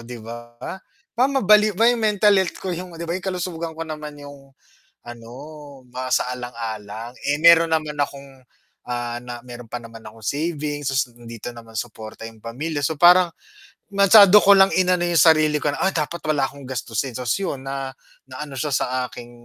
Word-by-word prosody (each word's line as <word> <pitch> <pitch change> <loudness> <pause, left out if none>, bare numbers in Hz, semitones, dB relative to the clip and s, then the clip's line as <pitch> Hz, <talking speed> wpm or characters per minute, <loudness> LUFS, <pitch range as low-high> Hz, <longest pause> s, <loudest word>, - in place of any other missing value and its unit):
'di 120 +1 -9
ba? 120 +1 -10 0.6
Ba 250 +4 +2
mabaliw 215 -6 +4
yung 235 +3 +3
mental 210 -1 +3
health 190 - -3
ko 185 - -4
yung 175 0 -7
'di 170 - -5
ba 170 - -3
yung 185 +1 -4
kalusugan 170 -3 -4
ko 165 - -4
naman 150 -2 -7
yung, 145 -1 -13 0.5
ano 120 -1 -10 0.6
masaalang-alang, 120 -3 -4 0.2
eh, 145 - +2
meron 170 0 +7
naman 155 -2 -1
akong, 140 -1 -5 0.5
ah, 120 -1 -3
na, 120 -1 -7
meron 120 -1 -10
pa - - -2
naman 115 -1 -12
akong 110 +1 -12
savings, 145 +2 -2
so 130 -2 0
dito 115 0 -8
naman 115 -1 -13
suporta 110 0 -7
yung 110 -1 -16
pamilya 145 +7 -4
so 160 +1 -1
parang, 175 0 +6 0.6
masyado 200 0 +7
ko 200 - +6
lang 195 0 +5
inano 180 -1 +2
yung 170 -2 +3
sarili 155 -2 +4
ko - - 0
na - - -6
"Ah, 190 - +2
dapat 165 +2 -3
wala 145 -3 +2
akong 140 0 -13
gastusin," 125 0 -3
ta's 125 -2 -1
yon 190 -9 -3
na 135 -1 -4 0.3
naano 135 +2 -8
siya 145 +3 -2
sa - - +1 0.2
aking 120 0 -11
145 Hz, 175 wpm, -22 LUFS, 120-175 Hz, 0.6 s, meron